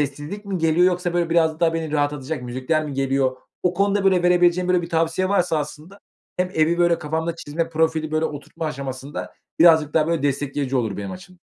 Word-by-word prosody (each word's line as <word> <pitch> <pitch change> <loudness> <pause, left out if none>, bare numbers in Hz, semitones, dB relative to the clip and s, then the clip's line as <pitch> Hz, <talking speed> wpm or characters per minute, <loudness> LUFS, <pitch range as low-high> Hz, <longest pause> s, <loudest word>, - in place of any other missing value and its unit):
sessizlik 150 +8 -4
mi 195 -2 -3
geliyor 165 +2 +3
yoksa, 180 -1 0
böyle, 170 -1 0
biraz 160 -1 +2
daha 165 -1 +2
beni 160 -2 -3
rahatlatacak 145 -1 -1
müzikler 130 +6 -1
mi 145 - -5
geliyor? 135 -1 0 0.3
O 180 0 +1
konuda, 200 +1 +1
böyle, 185 -2 +4
verebileceğin, 180 0 +3
böyle, 180 -1 +3
bir 170 - -6
tavsiye 165 +3 0
varsa 180 -5 +1
aslında 155 +6 -7 0.4
hem 180 0 0
evi, 160 +2 +2
böyle, 175 -1 +3
kafamda 160 +2 -2
çizme 165 +2 -3
profili, 160 -1 0
böyle, 155 +1 +1
oturtma 150 +2 -5
aşamasında 135 0 -6 0.3
birazcık 160 -3 +5
daha, 155 -1 +3
böyle, 165 -4 0
destekleyici 140 -1 -1
olur 110 -5 -1
benim 100 -1 -5
açım. 180 -1 -12
160 Hz, 190 wpm, -22 LUFS, 145-175 Hz, 0.4 s, birazcık